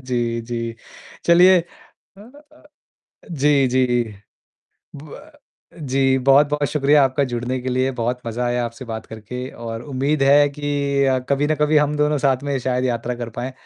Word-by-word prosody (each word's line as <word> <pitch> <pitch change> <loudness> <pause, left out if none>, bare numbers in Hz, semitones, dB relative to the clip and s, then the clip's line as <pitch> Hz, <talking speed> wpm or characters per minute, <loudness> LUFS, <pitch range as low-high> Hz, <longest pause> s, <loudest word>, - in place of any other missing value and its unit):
जी, 120 -2 -2
जी। 115 0 -5 0.5
चलिए 180 +2 +6
अ 170 - -18 0.4
अ, 290 +7 -18 0.7
जी, 140 -3 +2
जी। 125 -1 +1 0.9
ब 155 - -12 0.5
जी, 135 -1 +1
बहुत-बहुत 145 +2 +3
शुक्रिया 145 0 +3
आपका 135 +1 0
जुड़ने 120 +2 -3
के 130 - -5
लिए 130 +1 0
बहुत 125 +2 -2
मज़ा 115 +2 -3
आया 120 0 -1
आपसे 120 +3 -7
बात 110 0 -6
करके। 125 +4 -7
और 115 0 -7
उम्मीद 140 +2 -1
है 145 +1 +5
कि 140 -1 -1
अ, 130 -1 +2
कभी 140 +1 +1
ना 155 - +1
कभी 150 +1 +3
हम 150 0 +2
दोनों 150 0 +1
साथ 135 -1 +1
में 140 -1 -1
शायद 125 0 -1
यात्रा 120 0 -2
कर 120 -1 -6
पाएँ। 125 +2 -4
135 Hz, 165 wpm, -20 LUFS, 125-145 Hz, 0.9 s, चलिए